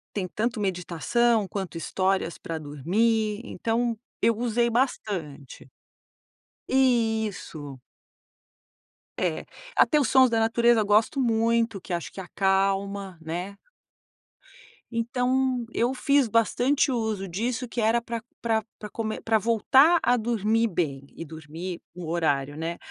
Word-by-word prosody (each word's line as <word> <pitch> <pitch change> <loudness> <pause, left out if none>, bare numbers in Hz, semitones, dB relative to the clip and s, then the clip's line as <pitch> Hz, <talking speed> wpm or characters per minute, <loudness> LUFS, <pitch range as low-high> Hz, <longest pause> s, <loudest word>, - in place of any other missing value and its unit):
Tem 195 -3 -1
tanto 225 +5 -2
meditação, 195 - +1
quanto 190 -3 -5
histórias 185 0 -1
pra 165 - -5
dormir, 205 - 0
então 230 -1 -1 0.2
eu 230 - +3
usei 235 0 +1
bastante. 190 - -3 1.0
Isso. 220 - 0 1.4
É, - - -1 0.3
até 300 - +4
os 275 - +2
sons 260 -1 +6
da 230 -1 +1
natureza 230 0 +3
eu - - -1
gosto 215 +6 +3
muito, 230 -3 +1
que - - -10
acho 170 -1 -3
que 195 - -7
acalma, 195 0 0
né. 175 +5 -5 1.3
Então 250 +1 0
eu 245 +3 +1
fiz 280 -1 +2
bastante 245 +5 +2
uso 220 -5 -2
disso 230 +7 -2
que 235 0 -3
era 225 +2 +3
pra 235 -1 -5 0.2
pra 225 -2 +1 0.2
pra 210 - -7
come 220 0 -4
pra 225 -1 +2
voltar 260 - +4
a 245 - +3
dormir 225 -1 +1
bem 150 -8 -2
e 165 - -7
dormir 160 +3 -7
no 175 -2 -7
horário, 145 -4 0
né. 165 +2 -4
220 Hz, 125 wpm, -26 LUFS, 180-235 Hz, 1.4 s, sons